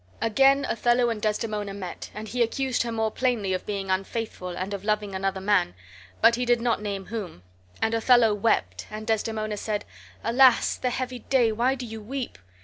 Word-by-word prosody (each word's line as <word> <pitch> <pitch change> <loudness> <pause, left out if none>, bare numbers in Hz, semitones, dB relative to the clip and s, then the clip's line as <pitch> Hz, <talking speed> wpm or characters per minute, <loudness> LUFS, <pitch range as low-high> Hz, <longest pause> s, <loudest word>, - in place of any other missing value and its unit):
Again 270 +5 +4
Othello 240 +1 +2
and 215 -2 -4
Desdemona 210 -2 -2
met, 185 -3 -7
and 215 +1 -6
he 245 +3 -2
accused 255 +2 +1
her 235 - -2
more 220 -1 0
plainly 230 -7 0
of 185 - -3
being 195 -2 -2
unfaithful 190 0 -3
and 185 +3 -4
of 200 -1 -5
loving 210 -1 -1
another 190 0 -1
man, 195 - +1 0.5
but 235 - +7
he 245 +1 0
did 240 -1 +3
not 235 -2 0
name 200 -2 -4
whom. 195 - -6 0.4
And 225 - +1
Othello 230 -1 +5
wept, 95 - 0
and 215 0 -7
Desdemona 215 -1 -1
said, 210 0 -3 0.4
"Alas! 255 0 +5
the 250 - -1
heavy 250 0 -3
day! 245 -3 +2
why 245 +5 +1
do 255 -2 -6
you 220 -1 -7
weep?" 255 +4 -5
220 Hz, 185 wpm, -26 LUFS, 205-240 Hz, 0.5 s, but